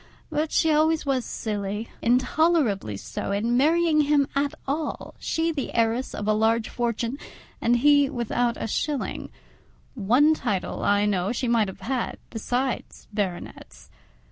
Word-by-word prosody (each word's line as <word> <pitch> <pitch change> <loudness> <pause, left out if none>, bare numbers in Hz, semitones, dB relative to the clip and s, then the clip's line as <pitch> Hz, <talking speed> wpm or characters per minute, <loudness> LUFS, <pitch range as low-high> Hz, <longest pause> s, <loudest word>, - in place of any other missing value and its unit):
but 305 +1 -1
she 320 - +3
always 310 +1 +2
was 265 -3 +1
silly—intolerably 225 - 0
so 195 - -5
in 225 +4 0
marrying 315 +3 +3
him 285 -1 +3
at 280 0 0
all, 300 +3 -3
she 325 +1 0
the 290 -4 -4
heiress 230 +2 +1
of 205 - -4
a 215 - +4
large 220 +1 +2
fortune 235 +2 -2 0.4
and 240 +1 +3
he 285 +2 +5
without 240 -2 -1
a - - -2
shilling: 285 +5 -2 0.6
one 255 +7 +4
title, 200 -11 -2
I 205 0 +3
know, 195 -1 0
she 245 +1 -2
might 230 -3 +3
have 190 0 -9
had, 250 +4 -2
besides 245 +3 -3
baronets. 175 - -5
245 Hz, 140 wpm, -25 LUFS, 215-290 Hz, 0.6 s, he